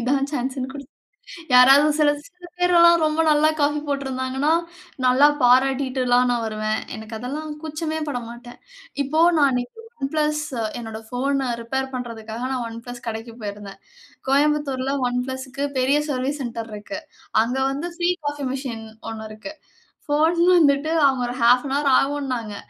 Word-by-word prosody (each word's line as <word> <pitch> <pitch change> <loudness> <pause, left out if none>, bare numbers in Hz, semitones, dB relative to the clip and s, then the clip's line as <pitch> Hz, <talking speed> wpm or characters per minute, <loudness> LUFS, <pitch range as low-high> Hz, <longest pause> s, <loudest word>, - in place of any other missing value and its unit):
இதான் 275 +3 0
சான்ஸ்ஸுன்னு 260 -1 -3
குடி 280 -1 -8 0.7
யாராவது 270 +4 +7
சில 295 -1 +5 0.2
சில 360 -2 -15
பேரெல்லாம் 340 -2 +5
ரொம்ப 310 +1 +1
நல்லா 305 +1 +4
காஃபி 295 +1 +1
போட்டிருந்தாங்கன்னா, 265 0 -1 0.6
நல்லா 265 +4 +6
பாராட்டிட்டுலாம் 255 -1 +3
நான் 235 -1 0
வருவேன். 215 0 -2
எனக்கு 220 0 -8
அதெல்லாம் 295 +6 -5
கூச்சமே 315 0 -3
பட 250 -4 -2
மாட்டேன். 240 +1 -11 0.4
இப்போ 310 +4 0 0.2
நான் 285 -2 +5
அன்னைக்கு 250 - -3 0.2
ஒன் 270 0 -2
பிளஸ் 300 0 +1 0.4
என்னோட 225 -2 -6
ஃபோன 270 +1 -1
ரிப்பேர் 265 +3 -3
பண்றதுக்காக 230 -1 -6
நான் 250 -2 -2
ஒன் 230 0 -8
பிளஸ் 245 -1 -9
கடைக்கு 225 +1 -5
போயிருந்தேன். 205 -1 -7 0.5
கோயம்புத்தூர்ல 280 -2 +1 0.2
ஒன் 245 - -1
பிளஸ்க்கு 260 +1 -5 0.2
பெரிய 275 +3 +3
சர்விஸ் 275 +2 -2
சென்டர் 230 -2 -5
இருக்கு. 210 +9 -6 0.4
அங்க 245 +3 -3
வந்து 305 +6 -4
ப்ரீ 345 +1 +2
காஃபி 290 -1 -3
மிசின் 240 -5 -5 0.3
1 220 -1 -7
இருக்கு. 215 +8 -9 0.6
போன் 320 +4 +2 0.2
வந்துட்டு 290 -1 +3
அவுங்க 265 -2 +2
ஒரு 245 - -5
0:30அன் 250 +3 +4
ஹவர் 285 -2 +2
ஆவுன்னாங்க. 260 -7 -2
265 Hz, 145 wpm, -22 LUFS, 245-290 Hz, 0.7 s, யாராவது